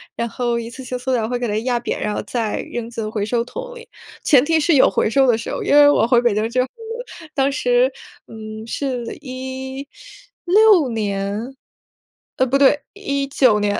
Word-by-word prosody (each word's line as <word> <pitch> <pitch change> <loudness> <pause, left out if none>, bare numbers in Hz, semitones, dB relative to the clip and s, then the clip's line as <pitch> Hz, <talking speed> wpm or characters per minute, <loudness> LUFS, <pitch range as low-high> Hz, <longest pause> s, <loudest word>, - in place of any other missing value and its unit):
然 235 0 -2
后 240 0 -1
一 230 0 -5
次 255 +2 -10
性 250 0 -4
塑 255 +1 -3
料 230 -4 +1
会 245 +1 -2
给 245 - -2
它 210 - -1
压 250 -2 +1
扁 - - -3
然 210 0 -2
后 - - -2
再 225 -4 -2
扔 235 -1 -4
进 225 -2 -4
回 210 -2 -2
收 235 +2 0
桶 - - -8
里， 475 0 -12 0.3
前 275 -2 +5
提 325 +1 +2
是 315 +1 +3
有 265 - +6
回 - - +1
收 270 +3 +3
的 235 -3 +4
时 - - -6
候。 - - -3
因 - - +1
为 290 0 +8
我 290 - +3
回 240 -1 +4
北 240 -3 +2
京 215 +2 0
之 255 +1 +1
后， 255 - -1 0.7
当 275 0 +2
时， - - +2 0.4
嗯， 220 0 -8
是 255 -1 -3 0.2
16 275 - 0
年， 210 +3 -3 0.8
呃， 260 - +3
不 270 +3 +2
对， 280 +1 +4
19 280 - +1
年 205 0 0
250 Hz, 205 characters per minute, -20 LUFS, 225-280 Hz, 0.8 s, 为